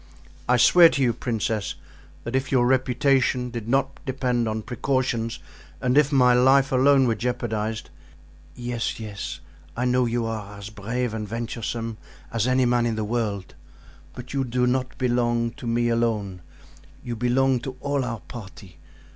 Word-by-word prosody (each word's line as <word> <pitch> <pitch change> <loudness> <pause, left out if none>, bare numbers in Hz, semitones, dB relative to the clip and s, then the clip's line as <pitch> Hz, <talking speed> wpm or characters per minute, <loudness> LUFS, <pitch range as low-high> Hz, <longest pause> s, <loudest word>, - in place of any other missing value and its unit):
"I 125 - +5
swear 170 +7 +7
to 140 - -2
you, 120 -2 +2
princess, 110 -3 -2 0.5
that 120 +2 -4
if 130 0 -1
your 125 -3 +4
reputation 130 -1 +2
did 115 -1 -6
not 135 +1 0
depend 125 -4 -1
on 110 0 -3
precautions 125 -2 -1 0.4
and 125 0 +1
if 150 0 +4
my 125 -3 +5
life 135 +2 +4
alone 135 +1 +5
were 115 - +2
jeopardized——" 110 -2 -3 0.6
"Yes, 120 -2 -3
yes! 105 -3 -6 0.4
I 125 - 0
know 125 0 +2
you 115 0 -1
are 105 -2 -5
as 100 +2 -8
brave 115 +3 -3
and 110 -1 -4
venturesome 115 0 -4 0.3
as 115 +1 +1
any 130 0 +3
man 120 -1 +2
in 115 - -1
the 110 - -2
world, 105 -4 -2 0.6
but 125 +1 -8
you 135 -1 +1
do 125 0 0
not 130 +1 -1
belong 120 -2 +1
to 120 - -9
me 120 +1 +1
alone; 110 -6 -1 0.6
you 120 - -4
belong 125 +2 +2
to 130 +1 -7
all 140 0 -1
our 115 -3 -4
party. 95 -6 -11
120 Hz, 160 wpm, -24 LUFS, 115-130 Hz, 0.6 s, swear